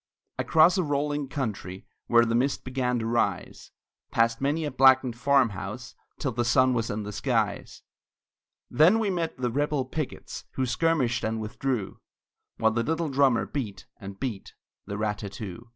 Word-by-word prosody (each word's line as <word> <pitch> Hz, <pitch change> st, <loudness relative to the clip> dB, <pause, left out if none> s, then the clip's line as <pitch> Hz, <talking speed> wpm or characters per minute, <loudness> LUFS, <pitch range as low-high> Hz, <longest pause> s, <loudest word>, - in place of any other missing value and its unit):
Across 165 Hz, +4 st, +4 dB
a -, -, +2 dB
rolling 145 Hz, -1 st, -1 dB
country, 105 Hz, -9 st, -5 dB, 0.2 s
Where 120 Hz, 0 st, +5 dB
the 115 Hz, -, -1 dB
mist 130 Hz, +4 st, +1 dB
began 125 Hz, -1 st, -1 dB
to 115 Hz, -, -3 dB
rise; 115 Hz, +1 st, -1 dB, 0.4 s
Past 115 Hz, +1 st, +1 dB
many 150 Hz, +4 st, 0 dB
a 150 Hz, -, -3 dB
blackened 130 Hz, -2 st, +5 dB
farmhouse, 120 Hz, -4 st, 0 dB, 0.2 s
Till 135 Hz, -, -2 dB
the 120 Hz, +1 st, -1 dB
sun 130 Hz, +1 st, +3 dB
was 115 Hz, -2 st, -1 dB
in 105 Hz, +1 st, -3 dB
the 105 Hz, -, -6 dB
skies; 110 Hz, -2 st, -2 dB, 0.8 s
Then 170 Hz, +9 st, +5 dB
we 215 Hz, -3 st, 0 dB
met 170 Hz, -5 st, -2 dB
the 125 Hz, -1 st, -1 dB
rebel 145 Hz, +1 st, 0 dB
pickets, 150 Hz, +2 st, -6 dB
Who 130 Hz, -, -1 dB
skirmished 130 Hz, -4 st, +1 dB
and 110 Hz, 0 st, -1 dB
withdrew, 110 Hz, 0 st, -3 dB, 0.6 s
While 110 Hz, 0 st, +3 dB
the 115 Hz, +1 st, 0 dB
little 160 Hz, +5 st, -1 dB
drummer 135 Hz, -3 st, +3 dB
beat, 105 Hz, -10 st, -5 dB
and 100 Hz, 0 st, -9 dB
beat 115 Hz, -8 st, -5 dB, 0.3 s
The 100 Hz, -1 st, -4 dB
rat 105 Hz, -1 st, -1 dB
tat 100 Hz, -2 st, -7 dB
too. 110 Hz, +2 st, -8 dB
125 Hz, 165 wpm, -27 LUFS, 110-140 Hz, 0.8 s, Where